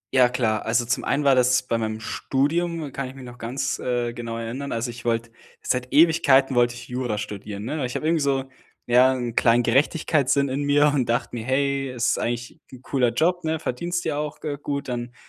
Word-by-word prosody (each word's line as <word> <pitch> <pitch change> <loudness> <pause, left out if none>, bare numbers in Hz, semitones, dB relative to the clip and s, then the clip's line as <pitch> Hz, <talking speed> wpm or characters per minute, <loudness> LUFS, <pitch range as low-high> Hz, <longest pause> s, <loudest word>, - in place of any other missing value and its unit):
Ja, 125 -1 +6
klar. 115 -4 0
Also, 115 +1 +2
zum 120 - -1
einen 150 - 0
war 140 -1 +5
das 125 0 +3
bei 115 -2 -1
meinem 110 0 -3
Studium 155 +6 -1
kann 135 -2 -3
ich 130 - -10
mich 135 - -10
noch 120 0 -11
ganz, 120 +4 -2
äh, 120 -1 -1
genau 115 -1 -5
erinnern. 125 +5 -5
Also, 120 +1 -2
ich 120 +1 -12
wollte, 115 0 -1 0.3
seit 125 0 -1
Ewigkeiten 140 -5 +4
wollte 120 0 +3
ich 120 0 -10
Jura 125 -4 -2
studieren, 105 0 -6
ne? 155 +5 -3
Weil 130 - -1
ich 120 - -8
habe - - -3
irgendwie 160 -1 +2
so, 135 -1 +1 0.4
ja, 125 +2 +5
'n 120 -3 -3
kleinen 120 +1 +4
Gerechtigkeitssinn 140 +1 +2
in 135 +2 -2
mir 145 +1 +4
und 130 -5 0
dachte 120 - 0
mir: 110 - -4
„Hey, 135 +1 0
es 125 -1 0
ist - - 0
eigentlich 120 +5 -3
'n 130 +1 -13
cooler 125 -4 +1
Job, 170 +8 +1
ne, 160 0 0
verdienst 175 +5 -3
ja 150 -2 -1
auch, 150 -1 -4
äh, 145 -2 -3
gut, 140 -1 -3
dann 120 -1 -4
125 Hz, 220 wpm, -24 LUFS, 120-140 Hz, 0.4 s, Ja